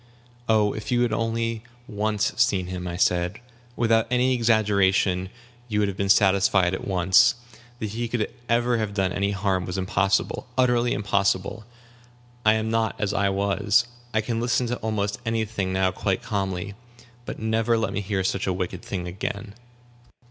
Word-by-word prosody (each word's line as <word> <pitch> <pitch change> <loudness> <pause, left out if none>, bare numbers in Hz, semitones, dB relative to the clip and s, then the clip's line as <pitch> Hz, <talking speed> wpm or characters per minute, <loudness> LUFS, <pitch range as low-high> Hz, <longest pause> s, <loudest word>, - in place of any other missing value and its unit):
"Oh, 105 -2 +3
if 110 - -6
you 120 -1 +2
had 120 -2 +1
only 115 0 -1 0.3
once 105 -1 -1
seen 110 -7 +2
him," 90 0 -5
I 85 0 -4
said; 90 +2 +1 0.4
"without 115 -1 +2
any 125 +1 +2
exaggeration, 100 -5 +2 0.4
you 105 -3 -2
would 105 -1 +2
have 100 - -3
been 100 0 -2
satisfied 95 -2 +4
at - - -4
once. 95 +1 +4 0.4
That 110 -3 -4
he 120 +2 -3
could 115 -2 -2 0.2
ever 120 0 +2
have 105 -2 -3
done 95 -2 0
any 100 0 0
harm 95 -2 0
was 90 +1 -4
impossible 95 +4 0
utterly 125 -1 +3
impossible. 100 +1 0 0.8
I 110 0 +5
am 110 0 -1
not 115 -1 0
as 105 -1 -1
I 100 -1 +2
was. 100 +3 +2 0.3
I 110 - +1
can 115 +1 -2
listen 120 +1 +1
to 120 - -1
almost 105 -2 -2
any 115 -1 0
thing 100 -3 -3
now 95 0 +1
quite 95 +1 -2
calmly. 95 -1 -3 0.5
But - - -5
never 110 +1 +1
let 110 -3 -1
me 100 - -1
hear 95 -1 -1
such 100 +1 -1
a 95 - +1
wicked 90 0 -4
thing 90 -2 -5
again." 105 +3 -5
105 Hz, 170 wpm, -24 LUFS, 95-115 Hz, 0.8 s, I